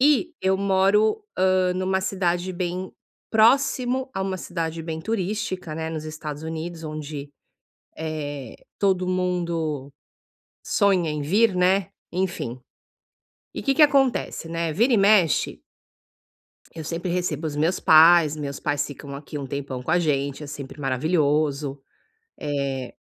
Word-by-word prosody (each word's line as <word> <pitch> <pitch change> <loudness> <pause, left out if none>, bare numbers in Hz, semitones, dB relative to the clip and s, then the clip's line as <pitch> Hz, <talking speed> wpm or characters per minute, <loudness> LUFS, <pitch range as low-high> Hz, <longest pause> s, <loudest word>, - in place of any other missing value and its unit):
E 300 +5 +3
eu 190 0 +3
moro, 200 - +3
hã, 185 -1 +3
numa 190 +1 0
cidade 185 -1 -1
bem 180 +1 -3 0.4
próximo 255 +3 +3
a 195 - -2
uma 190 -1 -2
cidade 165 -2 -4
bem 160 -1 -4
turística, 190 -4 -3
né, 160 0 -3
nos 155 -1 -5
Estados 155 -1 -6
Unidos, 160 +1 -5
onde, 150 -2 -6 0.7
eh, 145 -5 -5 0.2
todo 185 -2 +2
mundo 170 -6 -1 0.8
sonha 190 -6 +2
em 150 -1 -3
vir, 200 +7 +3
né, 185 +1 +2 0.2
enfim. 175 -9 -2 1.0
E - - -4
o - - -8
que 275 -1 +3
que 310 - +5
acontece, 270 - +2
né, 165 -1 -2
vira 235 - +3
e - - +5
mexe 195 -5 +3 1.1
eu 160 - -7
sempre 170 +3 -3
recebo 170 -3 -1
os 145 -1 -4
meus 165 +5 +1
pais, 160 0 +7
os 155 - -8
meus 140 -1 -5
pais 145 -1 0
ficam 140 0 -9
aqui 145 +1 -7
um 140 - -5
tempão 135 -1 -5
com 140 - -4
a 175 - +4
gente, 140 -3 -1
é - - -7
sempre 145 0 -8
maravilhoso, 145 0 0 0.6
eh 140 -3 -3
165 Hz, 145 wpm, -24 LUFS, 150-190 Hz, 1.1 s, pais